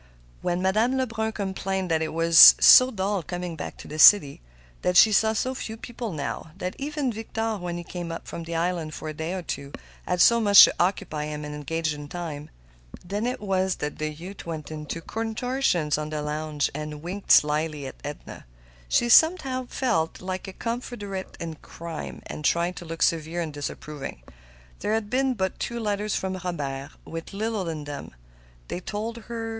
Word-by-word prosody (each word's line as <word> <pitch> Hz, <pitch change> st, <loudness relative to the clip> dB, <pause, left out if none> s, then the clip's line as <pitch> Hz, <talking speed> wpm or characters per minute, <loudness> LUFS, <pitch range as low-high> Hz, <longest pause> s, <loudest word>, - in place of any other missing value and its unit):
When 175 Hz, +1 st, -1 dB
Madame 220 Hz, +7 st, +2 dB
Lebrun 225 Hz, -4 st, -1 dB
complained 190 Hz, -2 st, -3 dB
that 160 Hz, -1 st, +2 dB
it 160 Hz, -, -2 dB
was 165 Hz, 0 st, +9 dB
so 255 Hz, 0 st, +9 dB
dull 200 Hz, -3 st, -1 dB
coming 175 Hz, 0 st, -5 dB
back -, -, -7 dB
to -, -, -11 dB
the 155 Hz, +1 st, -7 dB
city; 150 Hz, -5 st, +7 dB, 0.4 s
that 180 Hz, 0 st, +2 dB
she 220 Hz, -, +8 dB
saw 220 Hz, +2 st, +3 dB
so 255 Hz, +4 st, -1 dB
few 225 Hz, -3 st, -6 dB
people 235 Hz, -1 st, -6 dB
now; 155 Hz, +1 st, -5 dB
that 180 Hz, -1 st, -4 dB
even 285 Hz, -3 st, -2 dB
Victor, 225 Hz, 0 st, -3 dB
when 175 Hz, -2 st, -4 dB
he 175 Hz, -, -6 dB
came 175 Hz, -1 st, -6 dB
up 165 Hz, -, -7 dB
from 170 Hz, -, -6 dB
the 165 Hz, 0 st, -5 dB
island 165 Hz, -2 st, -1 dB
for 155 Hz, -, -6 dB
a -, -, -5 dB
day 160 Hz, +3 st, -4 dB
or 185 Hz, -, -4 dB
two, 140 Hz, -3 st, -5 dB, 0.4 s
had 180 Hz, 0 st, 0 dB
so 235 Hz, +5 st, +6 dB
much 205 Hz, -3 st, +9 dB
to -, -, +5 dB
occupy 170 Hz, -4 st, 0 dB
him 150 Hz, 0 st, -5 dB
and 150 Hz, -, -6 dB
engage 155 Hz, +2 st, -2 dB
his 145 Hz, -1 st, -7 dB
time; 155 Hz, -4 st, -6 dB, 0.6 s
then 205 Hz, +6 st, -2 dB
it 250 Hz, -, -2 dB
was 190 Hz, -2 st, 0 dB
that 150 Hz, 0 st, -5 dB
the 155 Hz, 0 st, -1 dB
youth 175 Hz, +6 st, -9 dB
went 160 Hz, -2 st, -6 dB
into 155 Hz, +1 st, -5 dB
contortions 225 Hz, -, -1 dB
on 150 Hz, 0 st, -4 dB
the 155 Hz, -1 st, -3 dB
lounge 150 Hz, 0 st, -2 dB
and 150 Hz, 0 st, -6 dB
winked 190 Hz, +4 st, -6 dB, 0.2 s
mischievously 150 Hz, -1 st, -2 dB
at 130 Hz, -, -7 dB
Edna. 145 Hz, 0 st, -8 dB, 0.4 s
She 240 Hz, -, +3 dB
somehow 265 Hz, -2 st, +4 dB
felt 165 Hz, -14 st, -1 dB
like 185 Hz, +1 st, -5 dB
a 190 Hz, -, -7 dB
confederate 210 Hz, -4 st, -5 dB
in 165 Hz, -2 st, -5 dB
crime, 165 Hz, +1 st, -8 dB
and 150 Hz, -, -7 dB
tried 170 Hz, +4 st, +1 dB
to 175 Hz, -, -8 dB
look 165 Hz, 0 st, -2 dB
severe 165 Hz, +1 st, 0 dB
and 160 Hz, -3 st, -4 dB
disapproving. 145 Hz, -, -6 dB, 0.6 s
There 215 Hz, -, 0 dB
had 220 Hz, -1 st, -3 dB
been 260 Hz, 0 st, +1 dB
but 190 Hz, -3 st, -2 dB
two 235 Hz, 0 st, -3 dB
letters 210 Hz, -1 st, -1 dB
from 190 Hz, 0 st, -2 dB
Robert, 140 Hz, -6 st, -4 dB, 0.2 s
with 165 Hz, +2 st, -7 dB
little 210 Hz, -3 st, -2 dB
in 155 Hz, -2 st, -5 dB
them, 145 Hz, -, -8 dB, 0.5 s
they -, -, -4 dB
told 215 Hz, +5 st, -5 dB
her. 230 Hz, -1 st, -4 dB
180 Hz, 190 wpm, -25 LUFS, 155-215 Hz, 0.6 s, was